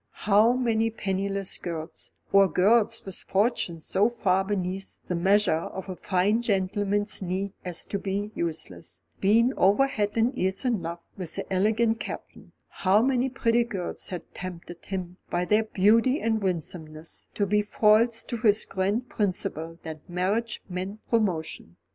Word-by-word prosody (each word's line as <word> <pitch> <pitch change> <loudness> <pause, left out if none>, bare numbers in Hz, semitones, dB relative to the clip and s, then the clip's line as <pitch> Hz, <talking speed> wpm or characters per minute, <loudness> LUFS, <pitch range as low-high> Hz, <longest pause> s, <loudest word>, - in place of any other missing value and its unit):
How 215 +3 +5
many 225 -3 +1
penniless 195 -2 -1
girls, 165 -1 -6 0.2
or 195 0 +7
girls 205 +6 +3
with 190 -2 -7
fortunes 190 -6 -1
so 205 +4 +2
far 195 -5 +1
beneath 190 -1 -3
the - - -3
measure 195 +4 +3
of 190 +3 -6
a 185 - -4
fine 195 +5 +1
gentleman's 205 -1 0
needs 190 +2 -2
as 180 -2 -2
to 200 - -3
be 200 +2 -3
useless, 95 - -5 0.2
had - - -34
been 230 +6 +4
over 200 +8 +5
head 210 -7 -1
and 235 +4 +2
ears 190 +1 -1
in 235 -7 +1
love 170 +1 -5 0.2
with 180 -4 -2
the - - -4
elegant 220 +4 +2
Captain; - - -8 0.2
how 200 +3 +2
many 260 0 +2
pretty 240 -2 +2
girls 200 -7 -5
had 180 -2 -5
tempted 175 -1 -8
him 180 -2 -5
by 175 +1 0
their 210 +4 +3
beauty 225 +8 +3
and 220 -1 0
winsomeness 165 -3 -4
to 205 - +1
be 210 +2 +2
false 220 +2 +3
to 240 - -4
his 215 -1 +3
grand 200 +6 -1
principle 165 -6 -2
that 160 -1 -8
marriage 200 +6 -1
meant 185 +3 -5
promotion. 170 - -1
195 Hz, 155 wpm, -26 LUFS, 180-220 Hz, 0.2 s, or